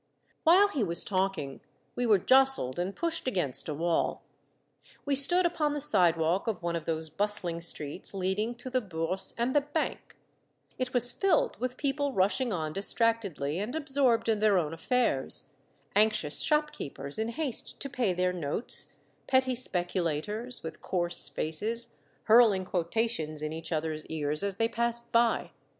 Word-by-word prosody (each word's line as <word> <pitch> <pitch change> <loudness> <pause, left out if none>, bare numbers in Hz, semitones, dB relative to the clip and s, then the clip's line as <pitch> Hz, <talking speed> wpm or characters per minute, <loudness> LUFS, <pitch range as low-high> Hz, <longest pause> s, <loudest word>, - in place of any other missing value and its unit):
While 375 +5 +6
he 280 - -1
was 170 -3 +2
talking, 190 -8 -2 0.3
we 245 0 -1
were 210 -2 +5
jostled 260 - +3
and 185 +3 -3
pushed 330 -4 -2
against 155 - +2
a 150 - -3
wall. 170 +2 -1 0.8
We 285 - 0
stood 350 +7 +5
upon 305 -4 0
the - - -2
sidewalk 175 - +2
of 205 -6 -3
one 170 0 -1
of 165 -2 -4
those 160 -1 -3
bustling 185 -3 -2
streets 155 0 -2
leading 195 +5 -2
to 245 +2 -8
the 255 0 +1
Bourse 180 -1 -4
and 240 +2 0
the 290 - +4
Bank; 295 +2 -4 0.6
it 255 0 -2
was 245 -1 +3
filled 385 -5 +1
with 250 +1 -3
people 285 0 -1
rushing 215 +6 +1
on 155 -5 -3
distractedly 195 -7 0
and 215 +7 -4
absorbed 270 -7 +1
in 220 -2 +1
their 210 -2 +3
own 160 -3 -1
affairs, 195 - 0 0.5
anxious 215 -8 +3
shop 300 -1 +1
keepers 140 +3 -6
in 220 - -1
haste 265 +1 -3
to - - -3
pay 245 -7 -1
their 180 0 0
notes, 170 - +2 0.3
petty 260 -1 +2
speculators, 190 +1 -3
with 160 - -8
coarse 175 -1 +2
faces, 225 +9 -1 0.3
hurling 220 -4 +5
quota 185 +6 0
tions 155 -8 -3
in 155 0 -3
each 165 +1 -7
other's 155 -1 -2
ears 150 -1 -1
as 200 -1 -2
they 225 +3 +1
passed 235 +1 -1
by. 235 -1 +2
210 Hz, 160 wpm, -29 LUFS, 170-250 Hz, 0.8 s, While